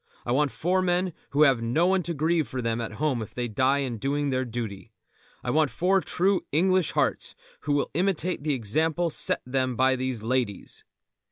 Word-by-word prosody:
I 120 - -2
want 145 +3 +2
four 180 +7 0
men 180 0 0 0.2
who 145 +2 +4
have 135 -5 +4
no 120 +9 +1
one 190 0 +3
to 170 0 -4
grieve 160 +1 +1
for 130 - -5
them 115 -1 -1
at 115 -2 -5
home 135 -1 -1
if 110 - -8
they 125 -1 -2
die 130 +5 +1
in 120 -4 -5
doing 140 +3 -1
their 130 0 0
duty. 115 -3 -6 0.5
I 120 - -1
want 155 0 +3
four 190 +5 +2
true 190 +2 +1
English 185 +2 +2
hearts - - 0 0.2
who 145 - -2
will 145 - 0
imitate 180 0 0
the 150 -1 0
example 160 +9 0
set - - 0
them 130 0 -1
by 130 +2 +3
these 130 -3 -3
ladies." 120 -4 -2
140 Hz, 195 wpm, -26 LUFS, 125-170 Hz, 0.5 s, who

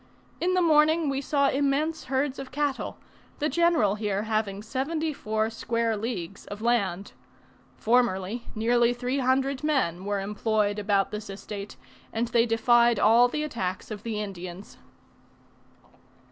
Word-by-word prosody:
In 365 +1 +1
the 365 - +3
morning 315 0 +4
we 275 0 -1
saw 280 0 +2
immense 285 +3 0
herds 270 +1 -1
of 270 -1 -7
cattle, 290 -1 -2 0.4
the 300 0 0
general 330 - +3
here 205 -1 -2
having 215 -2 -2
seventy 305 +7 -2
four 220 -3 -1
square 230 0 -1
leagues 200 -4 -5
of 205 - -7
land. 200 -5 0 0.6
Formerly 230 -1 +1
nearly 235 +2 +2
three 250 +3 -2
hundred 265 +2 +1
men 250 - 0
were 205 0 -1
employed 210 +1 0
about 200 -1 +1
this 210 0 -6
estate, 200 +1 -7 0.3
and 230 +1 -1
they 235 0 +3
defied 235 0 +4
all 230 +4 +6
the 300 +5 -3
attacks 205 -10 -4
of 210 -2 -5
the 220 -1 -3
Indians. 185 -2 -7
230 Hz, 140 wpm, -27 LUFS, 205-275 Hz, 0.6 s, all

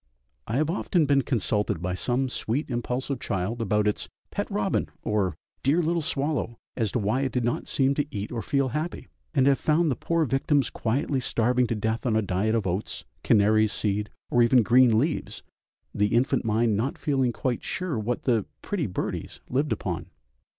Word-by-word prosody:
I 115 - -2
have 155 +4 +1
often 175 -3 +1
been 140 -1 +4
consulted 105 - 0
by 90 +2 -2
some 125 +7 0
sweet, 130 +3 -2
impulsive 125 +2 -2
child 110 0 -2
about 105 -1 +1
its 105 - -1 0.2
"pet - - -3
robin" - - 0
or 100 -6 0 0.3
"dear 145 +6 +3
little 170 0 +1
swallow," 140 -5 -2 0.2
as 110 -5 0
to - - +1
why 110 +4 +1
it 135 -2 -1
did 125 +1 0
not 120 +1 -1
seem 135 0 +2
to 145 +1 -1
eat 105 -6 -5
or 120 -2 -3
feel 140 +1 +1
happy? 155 +7 -4 0.3
and 130 -2 +4
have 140 -1 +4
found 155 0 +2
the - - 0
poor 165 +6 0
victims 135 0 +1
quietly 130 +4 0
starving 125 0 +1
to 115 - -1
death 110 +3 -1
on 110 - +2
a 110 - +2
diet 100 +4 0
of 110 -3 0
oats, 95 +3 -3 0.2
canary 110 +1 +4
seed, 105 0 -1 0.2
or 120 - +4
even 120 +1 +5
green 120 0 +5
leaves, 150 +7 -1 0.5
the 105 0 +2
infant 130 +2 +2
mind 110 0 +2
not 120 +7 -1
feeling 135 -4 +1
quite 125 0 -2
sure 180 -10 -2
what 115 +3 -2
the 115 -6 +1 0.2
"pretty 200 - -1
birdies" 90 - -4
lived 140 +4 0
upon. - - -3
120 Hz, 185 wpm, -26 LUFS, 110-140 Hz, 0.5 s, even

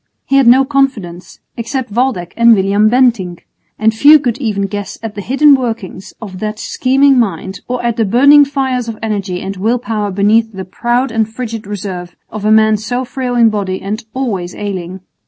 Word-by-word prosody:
He 275 - +1
had 270 -3 +4
no 260 +3 +6
confidants, 255 -11 -2
except 240 0 -4
Waldeck 230 -7 -1
and 235 -1 +5
William 200 +2 +2
Bentinck; 225 -8 +1 0.3
and 220 0 +2
few 290 +7 +7
could 250 -5 -3
even 210 -6 -1
guess 205 0 -6
at 225 -2 -5
the 205 - -6
hidden 275 +8 +4
workings 225 -8 -3
of 190 -5 -9
that 215 +1 -4
scheming 265 +3 +2
mind 190 -3 -3
or 250 0 -3
at 235 -1 -1
the 225 - +2
burning 280 +8 +6
fires 265 -3 -2
of 225 -1 -6
energy 200 -4 -3
and 195 0 -6
will 225 +6 0
power 215 -3 -3
beneath 215 +3 +1
the 190 -1 -7
proud 240 +7 -1
and 220 -1 -1
frigid 225 -3 -6
reserve 190 -4 -6 0.2
of 215 -1 -6
a 215 - +2
man 220 0 +4
so 245 +4 -3
frail 250 -1 -4
in 230 -2 +4
body 195 -3 -3
and 215 +4 -5
always 200 -10 -3
ailing. 190 -2 -6
220 Hz, 190 wpm, -14 LUFS, 200-250 Hz, 0.3 s, few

